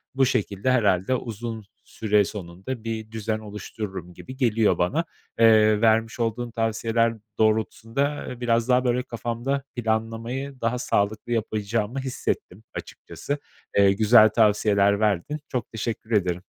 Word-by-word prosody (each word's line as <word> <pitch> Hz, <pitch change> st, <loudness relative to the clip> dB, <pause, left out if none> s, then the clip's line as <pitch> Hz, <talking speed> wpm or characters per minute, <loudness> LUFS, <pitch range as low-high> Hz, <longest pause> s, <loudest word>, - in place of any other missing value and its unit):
Bu 135 Hz, 0 st, +4 dB
şekilde 120 Hz, -1 st, 0 dB
herhâlde 105 Hz, -1 st, +2 dB
uzun 115 Hz, -2 st, -5 dB, 0.2 s
süre 105 Hz, -2 st, +1 dB
sonunda 95 Hz, +6 st, -7 dB
bir 110 Hz, -1 st, -5 dB
düzen 110 Hz, 0 st, -2 dB
oluştururum 100 Hz, -3 st, -7 dB
gibi 130 Hz, +8 st, -10 dB
geliyor 110 Hz, -7 st, +2 dB
bana. 145 Hz, -, +1 dB, 0.3 s
Eee, 110 Hz, -1 st, +5 dB
vermiş 115 Hz, +1 st, +2 dB
olduğun 115 Hz, +1 st, -1 dB
tavsiyeler 115 Hz, 0 st, +1 dB, 0.2 s
doğrultusunda, 110 Hz, +3 st, +1 dB, 0.2 s
ııı, 125 Hz, -, -7 dB
biraz 115 Hz, 0 st, +1 dB
daha, 125 Hz, 0 st, +4 dB
böyle, 125 Hz, +1 st, +1 dB
kafamda 120 Hz, +3 st, -3 dB
planlamayı 115 Hz, +4 st, -3 dB
daha 115 Hz, +2 st, 0 dB
sağlıklı 105 Hz, 0 st, -1 dB
yapacağımı 110 Hz, +2 st, -1 dB
hissettim 125 Hz, -6 st, -4 dB
açıkçası. 145 Hz, +1 st, -6 dB, 0.4 s
Eee, 100 Hz, -1 st, +6 dB
güzel 110 Hz, +1 st, +6 dB
tavsiyeler 105 Hz, -2 st, +3 dB
verdin. 105 Hz, -, 0 dB
Çok 125 Hz, -3 st, -3 dB
teşekkür 110 Hz, 0 st, -4 dB
ederim. 90 Hz, -4 st, +1 dB
115 Hz, 125 wpm, -25 LUFS, 105-120 Hz, 0.4 s, Eee